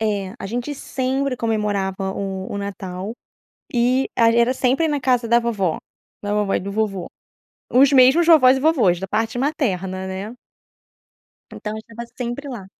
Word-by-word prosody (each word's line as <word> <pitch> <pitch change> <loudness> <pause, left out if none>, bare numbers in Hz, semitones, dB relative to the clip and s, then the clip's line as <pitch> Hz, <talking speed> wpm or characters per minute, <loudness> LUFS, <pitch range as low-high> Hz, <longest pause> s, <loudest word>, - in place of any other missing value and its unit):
É, 205 -3 -1
a - - -6
gente 245 +7 -3
sempre 265 0 -2
comemorava 200 -4 -1
o 190 -1 -4
o - - -3
Natal 195 -1 -5 0.6
e 250 +2 +2
ag 230 0 +4
era 235 +2 +3
sempre 265 +5 +1
na 290 -2 -1
casa 250 -2 +1
da 235 +1 +4
vovó, 210 -8 -1 0.5
da 205 0 -2
vovó 210 -2 0
e - - +1
do 200 - -5
vovô. 200 -4 -2 0.7
Os 270 +3 +6
mesmos 275 +6 +5
vovós 265 -6 +7
e - - -3
vovós, 255 - +3
da 195 - -5
parte 225 +4 -1
materna, 190 - -1
né. 195 +5 -6 1.2
Então 210 - -6
eu - - -5
estava 230 +2 -9
sempre 250 +3 -4
lá. 230 -8 -7
230 Hz, 165 wpm, -21 LUFS, 195-255 Hz, 1.2 s, vovós